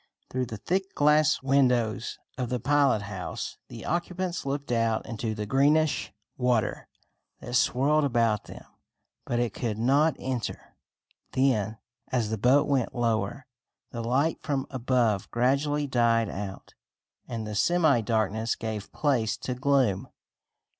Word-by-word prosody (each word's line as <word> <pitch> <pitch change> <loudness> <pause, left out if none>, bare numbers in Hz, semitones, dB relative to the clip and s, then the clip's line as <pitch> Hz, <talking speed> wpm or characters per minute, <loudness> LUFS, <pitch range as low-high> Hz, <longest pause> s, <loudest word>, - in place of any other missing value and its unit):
Through 130 -1 -1
the 110 -2 -6
thick 190 - -2
glass 150 -1 +3
windows 125 -4 +2 0.2
of 125 -3 -3
the 125 -1 -1
pilot 140 -4 +3
house 95 -3 -5
the - - -9
occupants 175 -1 -2
looked 140 -1 -3
out 115 -2 +1
into 110 -1 -3
the 105 -1 -3
greenish 145 +6 +2 0.3
water 125 -3 0 0.5
that 120 - -8
swirled 140 +5 +3
about 115 -5 +1
them; - - -11 0.6
but 120 - -1
it 120 -1 0
could 115 -4 -3
not 140 +7 +3
enter. 125 -4 -5 0.6
Then, 115 -5 +1 0.3
as 120 -4 0
the 110 - -2
boat 130 +6 +4
went 135 -4 0
lower, 120 +3 -1 0.5
the 115 - -4
light 135 +7 +1
from 140 -3 -1
above 120 -5 +1
gradually 140 +4 +1
died 115 -4 +2
out, 100 0 -7 0.5
and 115 -2 -4
the 105 - -5
semi 155 - +3
darkness 110 0 0
gave 110 -2 -5
place 120 -8 0
to 125 - -4
gloom. 125 -6 +1
125 Hz, 135 wpm, -27 LUFS, 110-140 Hz, 0.6 s, boat